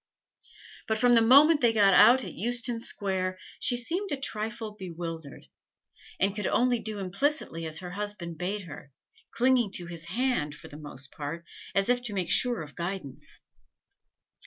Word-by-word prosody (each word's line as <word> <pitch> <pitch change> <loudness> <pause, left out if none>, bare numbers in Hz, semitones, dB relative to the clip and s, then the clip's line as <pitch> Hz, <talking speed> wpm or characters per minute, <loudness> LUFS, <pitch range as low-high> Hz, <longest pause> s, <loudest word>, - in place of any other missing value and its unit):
But 220 - +1
from 245 +2 +4
the 230 - +6
moment 285 +7 +7
that 240 - +5
they 225 - +2
got 200 -3 +5
out 250 +6 +7
at - - -7
Euston 240 +1 -1
Square 190 -4 -2 0.2
she 245 - +2
seemed 355 +11 0
a 285 - 0
trifle 225 -3 -3
bewildered, 165 -6 -7 0.7
and 195 +1 +2
could 210 -2 -2
only 245 -1 +2
do 215 -1 -5
implicitly 195 - -2
as 155 - -5
her 180 -1 -7
husband 190 -4 -5
bade 195 +3 -2
her 145 -4 -11 0.4
clinging 245 -4 +2
to 175 - -5
his 170 -1 -7
hand, 185 - -1
for - - -13
the 145 - -10
most 135 -3 -8
part, 165 +3 -6 0.3
as 195 0 +2
if 245 0 +2
to 230 -4 -5
make 180 -3 -1
sure 245 -8 +4
of 145 -2 -12
guidance. 175 -5 -6
205 Hz, 170 wpm, -28 LUFS, 170-240 Hz, 0.7 s, moment